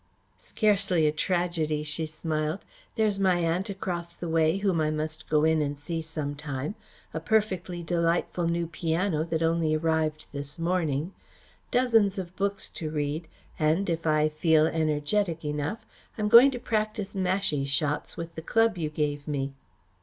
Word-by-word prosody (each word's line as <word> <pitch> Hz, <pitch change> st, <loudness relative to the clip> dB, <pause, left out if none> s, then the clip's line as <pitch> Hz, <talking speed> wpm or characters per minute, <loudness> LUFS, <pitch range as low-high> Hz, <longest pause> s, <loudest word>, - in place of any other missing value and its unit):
"Scarcely 195 Hz, -6 st, +2 dB
a 150 Hz, -, +4 dB
tragedy," 160 Hz, -2 st, 0 dB
she 155 Hz, +2 st, -3 dB
smiled. 155 Hz, +2 st, -3 dB, 0.3 s
"There's 215 Hz, -3 st, +1 dB
my 190 Hz, -2 st, +4 dB
aunt 175 Hz, +4 st, 0 dB
across 175 Hz, -3 st, -4 dB
the 175 Hz, -, -6 dB
way 160 Hz, +1 st, +2 dB
whom 195 Hz, -5 st, +1 dB
I 155 Hz, -, +2 dB
must 155 Hz, +1 st, -4 dB
go 150 Hz, -1 st, +3 dB
in 160 Hz, 0 st, +3 dB
and 145 Hz, -1 st, -2 dB
see 165 Hz, +3 st, -3 dB
some 155 Hz, -2 st, -4 dB
time, 145 Hz, +2 st, -4 dB, 0.4 s
a 160 Hz, -, -2 dB
perfectly 185 Hz, -2 st, 0 dB
delightful 170 Hz, 0 st, 0 dB
new 170 Hz, 0 st, 0 dB
piano 165 Hz, 0 st, 0 dB
that 165 Hz, 0 st, -1 dB
only 165 Hz, -1 st, +2 dB
arrived 155 Hz, -1 st, 0 dB
this 145 Hz, +2 st, -5 dB
morning, 165 Hz, -1 st, 0 dB, 0.6 s
dozens 225 Hz, -6 st, +3 dB
of 185 Hz, -1 st, -5 dB
books 200 Hz, +2 st, -1 dB
to 155 Hz, -, -5 dB
read 150 Hz, +2 st, -2 dB, 0.3 s
and, 165 Hz, +4 st, +2 dB
if 165 Hz, 0 st, -2 dB
I 155 Hz, 0 st, +4 dB
feel 155 Hz, 0 st, +3 dB
energetic 160 Hz, +2 st, 0 dB
enough, 150 Hz, +10 st, -3 dB, 0.3 s
I -, -, -3 dB
am 210 Hz, -, +1 dB
going 240 Hz, +5 st, +9 dB
to 255 Hz, -3 st, -4 dB
practise 215 Hz, -3 st, -2 dB
mashie 185 Hz, -6 st, 0 dB
shots 145 Hz, +1 st, -1 dB
with 165 Hz, 0 st, -6 dB
the 160 Hz, -, -6 dB
club 225 Hz, +3 st, +2 dB
you 155 Hz, -2 st, -1 dB
gave 145 Hz, -1 st, -2 dB
me." 140 Hz, -2 st, -2 dB
165 Hz, 160 wpm, -27 LUFS, 155-185 Hz, 0.6 s, going